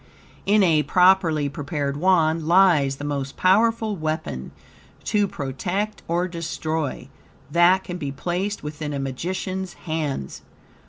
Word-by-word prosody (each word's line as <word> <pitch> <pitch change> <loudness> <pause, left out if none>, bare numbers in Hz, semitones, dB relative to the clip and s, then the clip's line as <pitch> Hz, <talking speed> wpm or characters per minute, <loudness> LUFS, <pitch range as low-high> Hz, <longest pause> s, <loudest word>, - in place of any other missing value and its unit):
In 205 0 +5
a 160 -4 +4
properly 180 -4 +3
prepared 140 0 -3
Wand 160 -1 +2
lies 170 -7 +4
the 145 - -9
most 140 -2 -3
powerful 220 +3 +3
weapon, 155 - -4 0.5
to 205 -1 +1
protect 185 +9 -3
or 175 +2 0
destroy, 160 -5 -3 0.4
that 175 +3 +4
can 180 - -6
be 140 -4 -3
placed 180 +8 -3
within 150 0 -5
a 140 - -3
magician's 185 +7 -4
hands. 150 - -3
165 Hz, 120 wpm, -23 LUFS, 145-185 Hz, 0.5 s, In